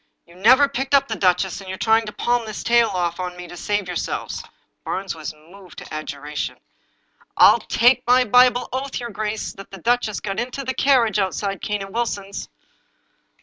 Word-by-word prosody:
You - - -19
never 250 +10 +5
picked 270 +1 0
up 275 0 +4
the 220 - -3
duchess, 185 -1 +1
and 190 - -10
you're 190 - -5
trying 225 +1 +2
to - - -4
palm 240 +1 0
this 215 - -6
tale 235 0 +4
off 175 -2 -2
on 180 -1 -4
me 180 0 -8
to 175 - -10
save 205 +2 -1
yourselves." 180 -1 -3 0.4
Barnes 195 +1 -3
was 160 -2 -6
moved 175 +4 -16
to - - -8
adjuration: 150 -1 -5 0.4
" - - -44 0.3
I'll - - +7
take 245 +2 +3
my 250 +1 +5
Bible 245 +1 +4
oath, 265 +1 -3
your 240 -1 -6
grace, 215 +1 -3
that 195 - -12
the 195 - -10
duchess 230 +2 0
got 195 -2 -4
into 255 +3 -4
the 260 0 -2
carriage 240 -8 +3
outside 195 0 -2
Cane 210 -1 -2
and 195 - -10
Wilson's." 200 -4 -3
210 Hz, 190 wpm, -22 LUFS, 185-245 Hz, 0.4 s, I'll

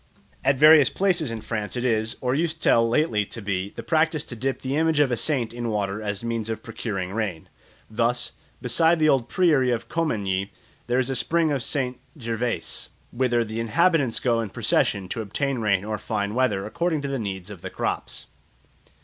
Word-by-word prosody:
At 135 0 +3
various 150 0 +8
places 180 -7 +1
in 115 -1 -5
France 110 0 -4
it 125 - -2
is, 110 -2 0
or 125 0 0
used 160 +2 0
till 115 -6 +4
lately 115 -5 +2
to - - -8
be, 100 -2 -2
the - - -6
practice 155 -1 +1
to 120 - -7
dip 130 +2 -2
the 135 +1 -2
image 160 0 +2
of 145 -3 +3
a - - +2
saint 120 -1 0
in 120 -1 -3
water 105 -1 -2
as 105 0 -3
a - - -5
means 115 -2 -2
of 110 -1 -4
procuring 100 -5 -4
rain. 100 -7 -3 0.4
Thus, 120 +2 0 0.3
beside 165 0 +4
the 155 -1 +3
old 130 -5 +2
priory 150 -8 +3
of 120 -2 -2
Commagny, 100 - -1 0.4
there 120 +1 +1
is 130 0 +1
a - - -1
spring 165 +4 +1
of 140 -3 0
St. 125 0 -2 0.2
Gervais, 115 0 -2 0.2
whither 120 -1 +1
the 110 0 -5
inhabitants 145 +2 +2
go 115 -2 +1
in 110 - -4
procession 95 0 +1
to 115 - -3
obtain 130 +5 -2
rain 100 -3 +1
or 105 -1 -3
fine 100 0 -2
weather 115 -6 +1
according 160 +6 -1
to - - -2
the 135 -1 -2
needs 95 -2 -5
of 95 -4 -10
the - - -5
crops. - - -3
120 Hz, 200 wpm, -24 LUFS, 110-140 Hz, 0.4 s, various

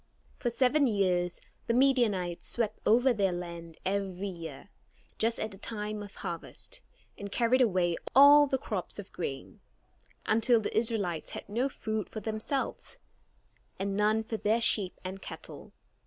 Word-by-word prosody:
For 240 - 0
seven 265 +4 +3
years 180 -5 +1 0.3
the 230 - +2
Midianites 230 -10 +2
swept 220 -3 -1
over 245 +4 +5
their 200 -4 +1
land 170 -2 -6
every 195 0 -1
year, 165 -3 -8 0.5
just 225 +1 +1
at 215 - -3
the 195 - -12
time 210 -1 -4
of 205 -1 -10
harvest, - - -7 0.4
and 200 0 -6
carried 245 +3 +3
away 180 -7 +2 0.2
all 285 +2 +9
the 265 - +1
crops 210 -7 -4
of 205 -2 -8
grain, 135 -6 -5 0.7
until 230 +2 +4
the 215 - -4
Israelites 215 -8 0
had - - -7
no 240 +6 0
food 220 -5 -3
for 220 - -5
themselves, 220 +6 -3 0.8
and 195 0 -2
none 215 +2 +2
for 220 0 -4
their 215 +2 +2
sheep 210 -5 +2
and 190 +1 -5
cattle. - - -9
215 Hz, 150 wpm, -30 LUFS, 185-235 Hz, 0.8 s, all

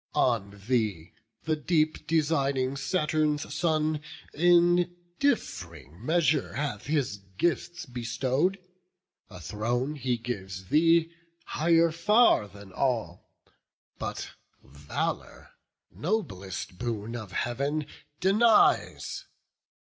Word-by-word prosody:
On 100 -5 +1
thee 105 -9 -1 0.3
the 155 - +1
deep 155 0 0
designing 140 -4 +1
Saturn's 150 0 0
son 155 -2 +1 0.3
In 175 +1 +4 0.2
diff'ring 85 - -2
measure 155 0 +2
hath 135 -7 -3
his 140 -9 0 0.2
gifts 175 - -1
bestow'd: 130 +8 -1 0.7
A 90 - -10
throne 120 - -2
he 130 -4 -1
gives 95 -6 -6
thee, 165 +1 +4 0.3
higher 165 +1 +3
far 170 - +4
than 100 -1 -14
all; 115 -10 -2 0.7
But - - -4 0.3
valour, 70 +2 -5 0.4
noblest 100 - -3
boon 115 -1 -3
of 110 -6 -7
Heav'n, 140 +8 -1 0.3
denies. 210 +4 +3
140 Hz, 90 wpm, -28 LUFS, 110-165 Hz, 0.7 s, In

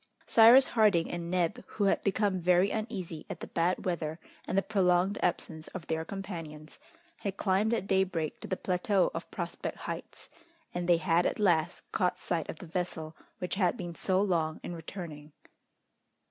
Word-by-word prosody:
Cyrus 235 +4 +7
Harding 210 -8 +3
and 170 -1 -4
Neb, 175 -1 0
who 210 - +1
had 195 - +2
become 200 -1 +1
very 180 +2 +3
uneasy 185 -7 -4
at - - -5
the - - -5
bad 175 +2 0
weather 160 -3 -2 0.3
and 185 - -1
the 195 - +4
prolonged 190 -1 +2
absence 160 -2 -2
of 175 -3 -5
their 160 0 -1
companions, 165 -5 -7 0.4
had 195 -1 -4
climbed 200 +3 +2
at 230 -5 0
daybreak 190 -5 0
to - - -8
the 185 - -2
plateau 185 +1 +1
of - - -6
Prospect - - -4
Heights, - - -7 0.5
and 175 0 -2
they 175 - +6
had 170 0 +2
at - - -2
last 175 -5 +2
caught 180 -3 +1
sight 165 -3 -2
of - - -5
the 180 - -9
vessel 165 -2 -4 0.2
which 180 - -3
had 180 -2 +2
been 175 -1 -5
so 185 +2 0
long 165 -5 +1
in - - -5
returning. 160 -3 -8
180 Hz, 175 wpm, -30 LUFS, 165-195 Hz, 0.5 s, Cyrus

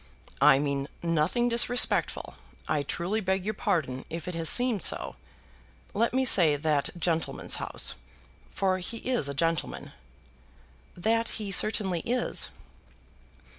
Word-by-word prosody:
"I - - +7
mean 140 -1 -2 0.2
nothing 170 +9 +1
disrespectful. 240 +1 +2 0.3
I 150 -1 0
truly 175 +9 -3
beg 190 -1 -1
your 215 - -1
pardon 130 -10 -2
if 165 +1 -6
it 180 - -4
has 165 -1 +1
seemed 245 -5 +3
so. - - 0 0.8
Let 230 +3 +1
me 260 +1 +1
say 165 - +6
that 145 -1 0
gentleman's 165 -1 -1
house; - - -1 0.6
for 190 -1 -1
he 185 +6 -6
is 245 - -1
a 140 - -5
gentleman." 165 +2 -2 1.1
"That 225 +5 0
he 210 -3 -5
certainly 190 -2 +2
is." 245 +7 0
180 Hz, 130 wpm, -27 LUFS, 155-220 Hz, 1.1 s, I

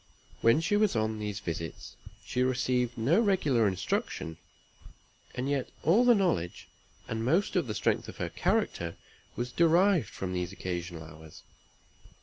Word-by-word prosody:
When 115 +7 +5
she 190 +5 +1
was 210 - +2
on 110 0 0
these 105 -1 -3
visits, 85 -4 -6 0.3
she 125 - -1
received 125 -1 +1
no 135 - +3
regular 150 - +2
instruction; 90 -3 -2 1.0
and 130 +1 -2
yet 140 -2 -1
all 205 +9 +5
the 245 -1 +7
knowledge, 130 - -1 0.4
and 110 0 -3
most 170 - +1
of 175 -8 +1
the 105 - -3
strength - - 0
of - - -10
her - - -2
character, 85 -1 -1 0.4
was 120 +1 -3
derived 170 - +4
from 95 -1 -5
these 90 -1 -2
occasional 85 -3 -5
hours. 80 0 -13
120 Hz, 145 wpm, -29 LUFS, -, 1.0 s, the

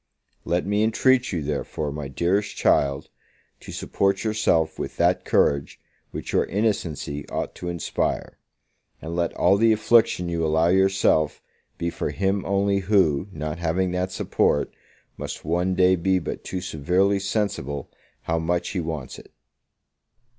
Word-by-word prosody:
Let 90 +1 0
me 105 +1 +1
intreat 125 +3 +3
you, 85 -5 -2
therefore, 75 0 -3
my 75 -1 -5
dearest 90 +9 0
child, 70 0 +1 0.5
to - - -10
support 100 -1 0
yourself 105 -7 +1
with - - -5
that - - +2
courage 70 -1 +1 0.3
which - - -6
your - - +3
innocency 85 -9 -2
ought - - -3
to 90 - -6
inspire: 85 -1 -2 0.6
and 80 +4 -6
let 85 -1 0
all 100 - +4
the 115 +2 +4
affliction 110 -4 +3
you 85 -1 -1
allow 80 +2 +2
yourself 95 -5 +2 0.3
be 85 0 -2
for - - -3
him 95 0 0
only 100 0 +1
who, 95 -5 +2
not 75 0 -5
having 90 +2 0
that 90 +1 -2
support, 75 -5 0 0.4
must - - -6
one 90 +3 0
day 90 0 +5
be 95 +2 +1
but 90 - -5
too 95 - -4
severely 90 +4 +1
sensible 95 - -2 0.4
how 80 0 0
much 85 +2 -1
he 95 - -2
wants 80 -6 -5
it. - - -16
90 Hz, 145 wpm, -24 LUFS, 80-100 Hz, 0.6 s, day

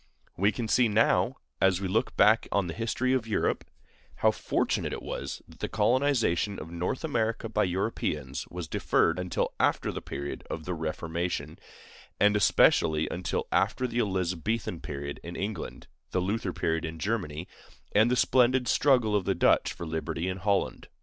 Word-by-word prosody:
We 100 +3 +3
can 115 -1 -4
see 120 +2 +4
now, 110 +1 +3 0.3
as 95 -2 +4
we 100 - -2
look 105 +5 0
back 110 +2 +5
on 100 -2 +2
the 85 - -4
history 115 +4 0
of 125 -4 0
Europe, 110 - 0 0.5
how - - +3
fortunate - - -1
it - - -6
was - - -5
that - - -17
the - - -3
colonization 110 -4 +2
of 80 - -8
North 90 - -3
America 115 -7 -1
by 105 -1 +1
Europeans 95 +5 -2
was 90 -2 -6
deferred 85 +3 +1
until 90 -1 -1
after - - +2
the - - -5
period 70 +1 -6
of 80 -1 -5
the 90 - -2
Reformation, 80 +2 -3 0.6
and 105 0 +5
especially 80 -5 +4
until - - -2
after 130 - +1
the 120 -1 -2
Elizabethan 95 -1 -1
period 70 -1 -6
in 85 +1 -8
England, 105 +3 -5 0.2
the - - 0
Luther 100 +2 -1
period 80 -1 -1
in 80 0 -5
Germany, 90 -4 -2 0.4
and 110 +3 +4
the 125 - +2
splendid 125 0 +3
struggle 125 -7 +3
of 100 -3 +1
the 95 - +1
Dutch - - +3
for 85 - -7
liberty 80 +1 -3
in 95 0 -2
Holland. 100 +1 -1
100 Hz, 170 wpm, -28 LUFS, 85-115 Hz, 0.6 s, back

